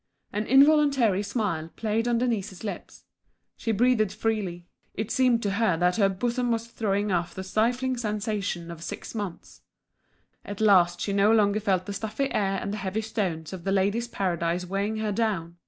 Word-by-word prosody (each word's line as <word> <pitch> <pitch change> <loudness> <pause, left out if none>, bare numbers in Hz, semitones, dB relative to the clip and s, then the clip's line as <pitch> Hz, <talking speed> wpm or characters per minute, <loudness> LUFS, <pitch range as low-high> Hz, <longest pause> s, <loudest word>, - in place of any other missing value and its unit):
An 210 +1 -2
involuntary 275 -7 +5
smile 200 -7 -2
played 225 +1 -1
on 240 -1 +2
Denise's 225 -6 -2
lips; 205 - -7 0.5
she 225 - -2
breathed 220 -2 +2
freely; 205 -5 -2 0.3
it 215 +2 -3
seemed 250 -3 +3
to 200 - 0
her 200 -4 +1
that 180 +3 +2
her 200 -3 +4
bosom 240 +5 -1
was 230 0 -1
throwing 205 -3 -1
off 175 -1 -1
the 190 - -5
stifling 245 +6 0
sensation 210 -6 -3
of 165 -1 -9
six 170 - -7
months. 205 -6 -6 0.8
At 205 -1 -7
last 180 -5 +4
she 200 - -1
no 200 +2 +4
longer 210 -2 +3
felt 190 -3 0
the 200 - -5
stuffy 220 +7 -3
air 195 -1 +1
and 200 - -4
the - - -3
heavy 195 +2 -2
stones 185 -7 -3
of 180 -3 -7
The 195 - -1
Ladies' 200 +5 +1
Paradise 175 -4 -1
weighing 200 +4 -2
her 215 -1 -1
down! 195 -6 -1
205 Hz, 175 wpm, -26 LUFS, 190-225 Hz, 0.8 s, involuntary